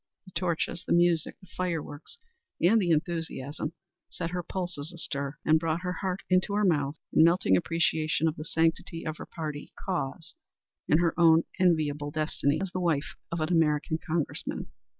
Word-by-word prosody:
The 185 - -14
torches, 170 0 -1
the - - 0
music, 170 -2 +3
the 190 - -17
fireworks 165 - -4 0.4
and 210 +6 +5
the 180 - 0
enthusiasm 160 -2 -1 0.4
set 165 - -4
her 180 0 -2
pulses 175 -4 -4
astir 140 -4 -3
and 160 0 +5
brought 165 +1 -1
her 180 0 -2
heart 190 0 -3
into 185 +2 +2
her 210 0 +3
mouth 145 -5 +2 0.2
in 155 - +6
melting 165 - +4
appreciation 160 - +1
of 160 - 0
the 155 - -6
sanctity 165 +1 0
of 155 0 -3
her - - -8
party 150 -3 -6
cause 165 -3 -3 0.6
and 155 +3 +5
her 170 -2 +2
own 165 -1 +6 0.2
enviable 150 -5 +2
destiny 155 -1 0
as 190 - -4
the 185 - -2
wife 160 -5 0 0.2
of 170 -1 -2
an 155 - 0
American 160 -1 +2
Congressman. 160 -2 -3
165 Hz, 170 wpm, -28 LUFS, 155-175 Hz, 0.6 s, in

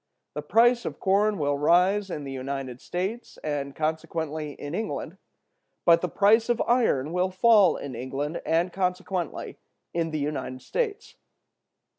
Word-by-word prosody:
The 150 - -4
price 235 +9 +4
of - - -5
corn 205 +2 +2
will 145 -2 0
rise 185 +6 +3
in 150 -4 -4
the 135 - -6
United 130 -1 -5
States, 195 +7 -4
and 140 -2 -3
consequently 155 -1 -3
in 145 +2 -7
England; 220 +5 -4 0.7
but 170 -1 +6
the 180 - -1
price 220 +6 +4
of 240 -1 +2
iron 175 - +2
will 180 +1 +1
fall 200 0 +5
in 140 - -6
England, 135 +6 -4
and 170 +2 +1
consequently 180 -2 -3 0.3
in 165 -1 0
the 155 - -3
United 145 -3 -4
States. 445 -4 -3
170 Hz, 145 wpm, -26 LUFS, 145-200 Hz, 0.7 s, but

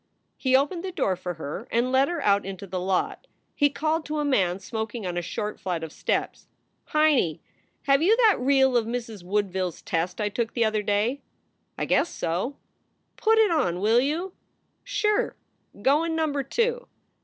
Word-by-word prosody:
He 260 -1 +2
opened 295 +6 +1
the 380 - -4
door 195 - 0
for 180 -1 -5
her 160 - -6
and 240 +2 +1
led 265 +1 +4
her 340 -4 -3
out 200 0 +3
into 195 0 -7
the 185 -1 -4
lot. 190 - -1 0.3
He 290 -1 +3
called 310 +3 -1
to 305 +1 -2
a 295 - 0
man 190 -11 +2
smoking 220 +1 -5
on 180 -1 -3
a 175 - 0
short 210 +5 -4
flight 175 -4 -3
of 160 - -6
steps: - - -2 0.4
"Heinie, 305 - +2 0.4
have 275 0 +3
you 415 +7 +4
that 450 -5 +5
reel 265 0 +3
of 230 -2 +2
Mrs. 230 -5 -5
Woodville 190 -1 0
s 175 - -10
test 170 +2 -2
I 210 - +1
took 225 +2 -2
the 235 -2 +3
other 215 -1 +1
day?" 210 +6 0 0.6
"I - - -1
guess 345 - +2
so." 180 +12 -2 0.3
" - - -47
Put 445 0 +3
it 435 -4 +5
on, 255 - +1
will 220 +4 +4
you." 325 +8 -1 0.5
"Sure! 445 -4 0 0.4
Go 275 +9 +3
in 330 -1 -1
Number 305 -3 0
Two." 475 - -1
245 Hz, 190 wpm, -26 LUFS, 195-310 Hz, 0.6 s, that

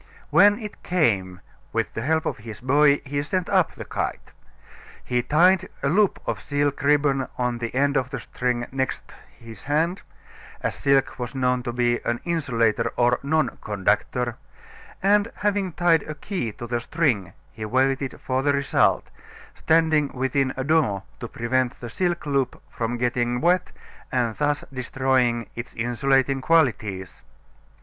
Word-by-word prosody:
When 200 +6 +6
it 215 -3 -8
came, 100 - 0 0.3
with - - -1
the 110 - -4
help 160 +5 +1
of - - -2
his 110 0 -9
boy, 140 +2 +4
he 140 +1 -2
sent 185 +4 -2
up - - +2
the - - -8
kite. - - -4 0.7
He 125 -1 0
tied 170 +8 +3
a 140 - +2
loop 200 +5 +3
of - - -3
silk 145 -1 -1
ribbon 140 -2 +2
on 125 -1 -1
the 115 +1 -4
end 140 +2 +2
of 130 -2 +1
the 135 -2 -4
string 120 0 -2
next 130 0 -3 0.2
his 115 -4 -12
hand 160 +6 0 0.6
as - - -1
silk 135 -1 +1
was 120 +1 -5
known 125 -1 +1
to 120 -1 -4
be 120 0 +1
an 120 0 -1
insulator 125 -10 +1
or 120 0 +3
non 150 -2 0
conductor 110 +4 0 0.7
and 205 +3 +3
having 205 -2 0
tied 170 -2 +3
a 155 - -4
key 170 - -3
to 120 - -8
the 120 0 -1
string 120 - 0 0.2
he 110 - -8
waited 130 +4 0
the 135 +2 +2
result, 140 -1 +2 0.5
standing 160 -2 +2
within 130 +1 0
a 130 - -1
door 135 -10 +1 0.2
to 120 - -5
prevent 125 +2 -1
the 120 -2 -7
silk 175 +3 -1
loop 140 -3 0
from 120 +1 -2
getting 120 0 0
wet 180 +3 +2 0.4
and 120 -4 0
thus 145 0 0
destroying 130 -2 +1
its 120 +1 -7
insulating 135 +3 +1
qualities. 115 - +1
130 Hz, 155 wpm, -24 LUFS, 120-150 Hz, 0.7 s, When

